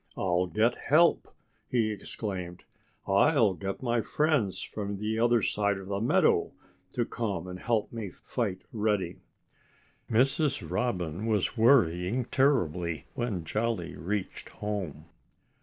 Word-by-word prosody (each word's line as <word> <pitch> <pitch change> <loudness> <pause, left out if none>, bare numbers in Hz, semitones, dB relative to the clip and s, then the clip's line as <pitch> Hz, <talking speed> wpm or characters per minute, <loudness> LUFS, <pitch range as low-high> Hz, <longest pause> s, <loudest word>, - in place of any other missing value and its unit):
"I'll 90 -1 +1
get 110 +6 +2
help!" 165 +4 +3 0.4
he 115 -3 +1
exclaimed. 95 -3 -5 0.4
"I'll 100 +2 +4
get 95 +5 -5
my 120 -2 +1
friends 145 - +1
from 100 -1 -4
the 110 +2 -2
other 120 -2 +3
side 100 -1 +1
of 95 0 -9
the 100 0 -1
meadow 115 - +3 0.4
to 120 - 0
come 100 -9 -3
and 90 0 -7
help 115 -1 0
me 110 -4 -4
fight 95 -1 -4
Reddy." 105 -5 0 0.9
Mrs. 135 +5 +2
Robin 95 -4 -2
was 105 -2 +1
worrying 115 -2 +3
terribly 90 - +1
when 110 -8 -2
Jolly 105 -1 -2
reached 95 +5 -4
home. 95 -8 -5
105 Hz, 125 wpm, -29 LUFS, 95-120 Hz, 0.9 s, I'll